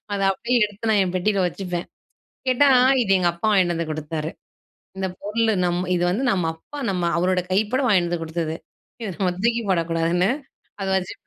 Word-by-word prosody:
அத 200 - -1
அப்படியே 235 +6 -1
எடுத்து 210 +2 -6
நான் 210 -2 +4
என் 180 -1 -4
பெட்டியில 195 +2 +1
வச்சுப்பேன். 180 -1 -4 0.6
கேட்டா, 255 +3 +4 0.3
"இது 205 -5 0
எங்க 175 -1 +2
அப்பா 170 +5 -2
வாங்கிட்டு 185 -4 +3
வந்து 165 -1 -3
குடுத்தாரு. 155 0 -4 0.7
இந்த 190 - -1
பொருள் 220 +3 0
நம் 175 0 0
இது 175 - 0
வந்து 225 +9 -1
நம்ம 180 -3 0
அப்பா 285 - -11
நம்ம 180 -2 0
அவரோட 180 +1 +2
கைப்பட 215 +7 +1
வாங்கிட்டு 185 -7 +3
வந்து 170 -1 -2
குடுத்தது. 160 0 -3 0.5
இத 220 - -3
நம்ம 185 -2 +1
தூக்கி 235 0 +2
போடக்கூடாதுன்னு" 170 +2 +1 0.5
அத 195 - -2
வச்சுபேன். 185 -1 -5
185 Hz, 175 wpm, -23 LUFS, 170-210 Hz, 0.7 s, நான்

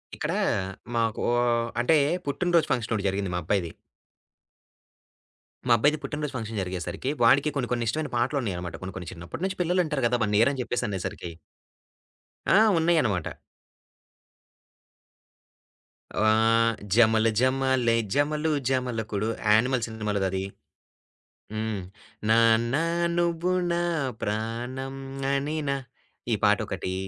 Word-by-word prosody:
ఇక్కడ - - -2 0.6
మాకో 115 -1 0 0.5
అంటే 125 +7 +4 0.3
పుట్టినరోజు 170 +3 +1
ఫంక్షన్ 115 -2 0
ఒకటి 100 -2 -1
జరిగింది. 95 -1 -2
మా - - 0
అబ్బాయిది. 85 -1 0 2.0
మా 120 - +6
అబ్బాయిది 145 +7 +3
పుట్టినరోజు 150 -1 -4
ఫంక్షన్ 110 -3 -4
జరిగేసరికి 90 +7 -4
వాడికి 140 +3 +5
కొన్ని, 130 -4 -1
కొన్ని 120 -1 0
ఇష్టమైన 150 +6 -1
పాటలున్నాయనమాట. 115 - -2
కొన్ని, 95 0 -6
కొన్ని 90 -3 -6
చిన్నప్పటి 85 - -8
నుంచి 190 -1 -4
పిల్లలింటారు 170 -5 0
కదా! 120 +1 0
1 105 0 -1
ఇయర్ 115 +5 +5
అని 135 - -3
చెప్పేసనేసరికి. 100 -7 -3 1.2
ఆ! - - +7 0.2
ఉన్నాయన్నమాట. 150 - +1 2.9
ఆహ్, 115 +1 +3 0.2
జమల 110 0 +5
జమ్మాలే 130 -2 +2 0.2
జమలు 150 +2 +1 0.2
జమలకుడు 115 -5 -1 0.2
'యానిమల్' 115 +3 +3
సినిమాలోదది. 100 -4 -2 1.1
హ్మ్. 110 -2 -3 0.5
నాన్న 115 +2 +4 0.4
నువ్వు 175 +1 +1 0.2
నా 170 0 0 0.4
ప్రాణం 120 +5 -3 0.4
అనినా 140 0 -1 0.6
ఈ - - +3
పాటొకటీ 95 - +1
115 Hz, 100 wpm, -26 LUFS, 105-140 Hz, 2.9 s, ఆ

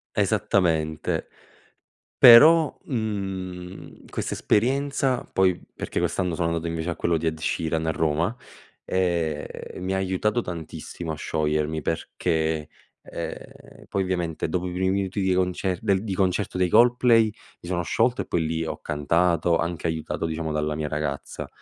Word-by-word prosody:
Esattamente. 80 -5 0 0.9
Però, 155 +7 +8
mhmm, 95 -6 -5
questa - - -3
esperienza, 135 +2 +1
poi 95 -2 +2
perché - - -4
quest'anno 90 -2 0
sono 85 0 0
andato 85 0 -2
invece 85 +1 -2
a - - -4
quello 85 -1 +1
di 80 +1 -3
Ed 80 0 -1
Sheeran 80 +1 -1
a 80 - +1
Roma, 80 +7 0 0.5
ehm, 85 -5 0
e - - -9
mi 95 +1 -2
ha 95 - 0
aiutato 95 +5 0
tantissimo 80 -2 -6
a - - -4
sciogliermi, 75 0 -1
perché, 80 -1 -1 0.3
ehm, - - -9
poi 95 - 0
ovviamente 90 -4 -2
dopo 90 +2 -2
i - - -5
primi 95 +1 0
minuti 100 0 -1
di 95 -1 +2
concer 90 0 0
di 100 +1 0
concerto 95 0 0
dei 90 -1 +2
Coldplay, 120 +1 +5
mi 105 -4 -11
sono 90 -1 0
sciolto 120 +8 +1
e - - -12
poi 80 -2 0
lì 80 +1 -1
ho - - -5
cantato, 85 +3 +1
anche 85 -1 -2
aiutato, 80 0 -3
diciamo, 80 0 -3
dalla 75 0 -1
mia 75 -1 -2
ragazza, 75 -2 -4
90 Hz, 150 wpm, -25 LUFS, 80-95 Hz, 0.9 s, Però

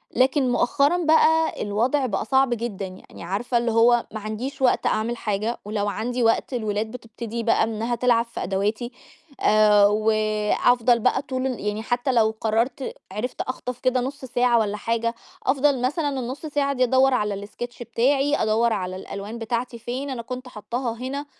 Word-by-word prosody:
لكن 260 +1 +3
مؤخرًا 285 +8 +2
بقى 320 0 +3
الوضع 245 +7 +1
بقى 205 -4 -2
صعب 265 +1 +3
جدًا 220 -4 -4
يعني، 185 -2 -12
عارفة 210 +7 -1
اللي 235 -1 0
هو 235 +1 +4
معنديش 220 +6 -5
وقت 255 - +2
أعمل 230 +2 0
حاجة، 215 +3 -2
ولو 205 -1 -1
عندي 240 +4 -2
وقت 225 +3 +1
الولاد 215 -1 -2
بتبتدي 230 -1 -6
بقى 225 - +3
إنها 225 +2 -1
تلعب 235 -1 +2
في 235 - -6
أدواتي، 210 +5 -1 0.5
آآ، 210 -1 +5
وأفضل 215 +3 +2
بقى 255 +3 +2
طول 260 -1 -3
ال 255 - -3
يعني 210 +1 -2
حتى 245 +3 0
لو 220 -2 +2
قررت 230 +4 0 0.2
عرفت 215 +5 -4
أخطف 250 -1 -5
كده 255 -1 +1
نُص 270 +1 -5
ساعة 245 -1 +2
والّا 210 -1 -1
حاجة، 230 +2 -1 0.3
أفضل 270 -1 +2
مثلًا 285 +1 -1
النُص 255 +6 -5
ساعة 285 -2 0
دي 255 -1 +1
أدوّر 260 +2 +4
على 205 -3 -1
الsketch 240 +3 -8
بتاعي، 270 +5 +1
أدوّر 225 0 +2
على 185 -2 -3
الألوان 200 +4 -7
بتاعتي 235 +1 -3
فين، 255 +5 -4
أنا 250 -3 -4
كنت 255 +2 -7
حطاها 235 +2 -4
هنا. 275 +3 -4
235 Hz, 165 wpm, -24 LUFS, 215-255 Hz, 0.5 s, آآ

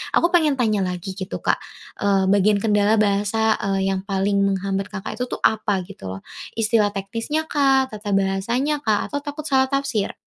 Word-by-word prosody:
aku 340 - +3
pengen 315 -5 +3
tanya 220 -5 +1
lagi, 180 0 -3
gitu, 190 0 -6
Kak, - - +1 0.4
eee, 200 -1 +2
bagian 205 +1 +4
kendala 210 0 +3
bahasa, 215 +1 +1
eee, 195 -1 0
yang 190 - -1
paling 200 0 +1
menghambat 195 0 -1
Kakak 205 +2 -6
itu 250 - -1
tuh, - - -6
apa, 210 -3 +2
gitu, 180 - -10
loh? 95 +1 -7 0.3
Istilah 215 -2 +2
teknisnya 230 +11 -3
kah, 270 -2 +3
tata 210 -2 -2
bahasanya 230 +10 0
kah, 215 -7 +1
atau 285 - -1
takut 290 +1 -6
salah 265 -3 +2
tafsir? 275 -6 -1
210 Hz, 175 wpm, -22 LUFS, 195-260 Hz, 0.4 s, bagian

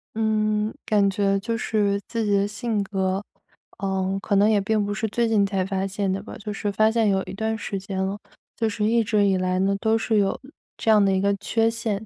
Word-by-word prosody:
嗯， 215 -1 +1
感 205 -2 +3
觉 195 0 +1
就 230 +3 -2
是 205 -3 0
自 230 -1 -2
己 210 - 0
的 200 0 +1
性 215 -1 -2
格， 190 0 -1 0.6
呃， 190 0 -1
可 200 - 0
能 200 +1 +5
也 210 -2 +3
并 210 +1 0
不 205 - -2
是 220 +1 -2
最 235 +2 0
近 215 -3 +3
才 195 -2 0
发 195 0 -2
现 195 0 -2
的 190 +1 -2
吧， 220 - -9
就 210 -1 -6
是 205 0 -2
发 215 +2 +3
现 225 -2 +2
有 190 -1 +1
一 - - -8
段 220 +2 -2
时 200 -2 -4
间 190 0 -6
了， 190 +2 -2 0.4
就 225 -2 0
是 210 0 -2
一 230 +1 +3
直 210 -1 +2
以 195 -1 +2
来 185 0 0
呢， 195 +1 +2
都 220 0 +2
是 225 -1 0
有 195 -1 0 0.4
这 225 - +2
样 210 -1 +6
的 195 - +3
一 190 - +2
个 200 +1 +2
缺 225 +3 +1
陷。 220 -2 -2
205 Hz, 255 characters per minute, -24 LUFS, 195-220 Hz, 0.6 s, 样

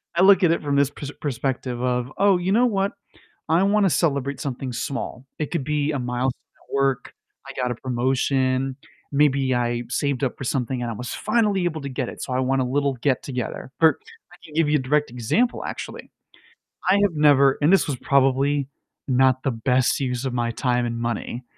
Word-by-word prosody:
I 170 - +3
look 195 0 +6
at 170 - +5
it 170 - 0
from 145 -1 -1
this 140 -1 +3
pers 145 -1 -7
perspective 125 -2 -2
of, 125 0 -1
"Oh, 195 -1 +4
you 180 +2 -1
know 235 +5 +4
what? 200 -1 0 0.5
I 165 +3 +3
wanna 200 -1 +3
celebrate 140 -5 0
something 130 -3 -4
small," 135 0 -4
it 150 - -3
could 170 -6 -1
be 150 +1 0
a 145 - -2
milestone 125 +1 -2 0.3
at - - -12
work 135 -2 0 0.3
I - - -7
got 125 -1 0
a - - -3
promotion 130 +1 0 0.4
maybe 140 -2 +3
I 120 -1 0
saved 140 +1 -1
up 130 - -1
for 130 - -6
something, 125 0 -1
and 120 - -2
I - - -3
was 125 +3 -6
finally 210 -4 +1
able 160 -3 -2
to 140 - -5
get 130 -1 -3
it, - - -8
so, - - -5
I 125 - 0
want 130 +1 +1
a - - 0
little 140 +2 0
get-together, 130 -3 -2
or 160 -1 +5 0.3
I - - -14
can 155 - -14
give 160 -2 +2
you 150 - +4
a - - -2
direct 150 +3 +1
example, 125 - 0
actually, - - -7 0.8
I - - +6
have 195 -5 +1
never, 140 -2 +5
and 150 +6 +4
this 195 - +4
was 145 - -1
probably 140 +1 +2 0.4
not 130 0 +3
the 135 - +1
best 125 +2 +1
use 125 -2 -2
of 130 - -2
my 120 -1 0
time 125 0 0
and 115 -1 -3
money, 120 +1 -3
135 Hz, 205 wpm, -23 LUFS, 125-150 Hz, 0.8 s, look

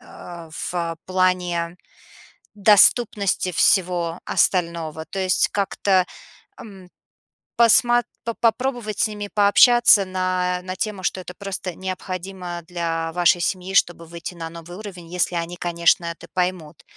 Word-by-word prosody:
а, 170 -2 -11
в, 165 - -4
а, 170 -1 -2
плане 180 -2 0 0.8
доступности 205 -2 +3
всего 175 -1 +1
остального, 165 -3 0
то 195 +5 -6
есть 185 -1 +2
как-то, 195 -2 +1 0.5
ам, 195 -4 -13 0.7
посмо 240 +1 +5 0.2
по 230 - -2
попробовать 235 -2 -1
с - - +4
ними 205 -1 -7
пообщаться 210 +1 +5
на 185 -1 -1
на 185 0 -6
тему, 210 -3 -4
что 185 - -2
это 180 - -10
просто 195 -3 -5
необходимо 185 -1 -6
для 165 -2 -3
вашей 175 0 +3
семьи, 185 +2 -3
чтобы 175 -3 +1
выйти 170 +1 -8
на 165 -1 -6
новый 170 +1 -11
уровень, 190 -5 -10
если 180 0 0
они, 170 +1 -3
конечно, 170 0 +1
это 170 0 -7
поймут. 180 -4 -3
185 Hz, 130 wpm, -22 LUFS, 170-200 Hz, 0.8 s, посмо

